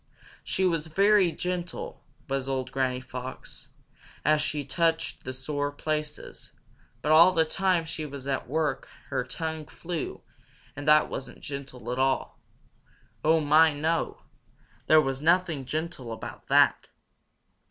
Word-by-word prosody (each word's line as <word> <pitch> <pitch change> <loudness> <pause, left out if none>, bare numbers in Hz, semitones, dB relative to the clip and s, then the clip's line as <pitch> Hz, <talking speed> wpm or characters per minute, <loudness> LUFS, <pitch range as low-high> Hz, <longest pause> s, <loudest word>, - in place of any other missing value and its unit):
She 190 - 0
was 165 -3 +1
very 195 +2 +4
gentle, 180 0 -4 0.2
was 135 0 -2
old 130 -1 -2
Granny 130 -1 0
Fox, 130 0 -8 0.6
as 150 +1 +4
she 145 -2 -2
touched 165 +4 0
the 130 - -3
sore 145 +2 -2
places, 150 +1 -5 0.5
but 150 - +1
all 165 +4 +8
the 160 -2 +3
time 185 0 +1
she 160 -1 -5
was 140 -3 -7
at 135 -1 -2
work 150 -1 -1 0.2
her - - 0
tongue 160 -2 -5
flew, 170 -1 -5 0.5
and 145 +1 -7
that 150 0 +6
wasn't 130 -1 -7
gentle 135 -4 -6
at 125 - -2
all. 135 0 0 0.8
Oh, 160 +1 +4
my, 155 +1 +5
no! 160 +3 -1 0.6
There 155 - +7
was 135 -1 -2
nothing 165 -3 +2
gentle 155 -4 -4
about 110 - -8
that! - - +4
150 Hz, 135 wpm, -27 LUFS, 135-165 Hz, 0.8 s, all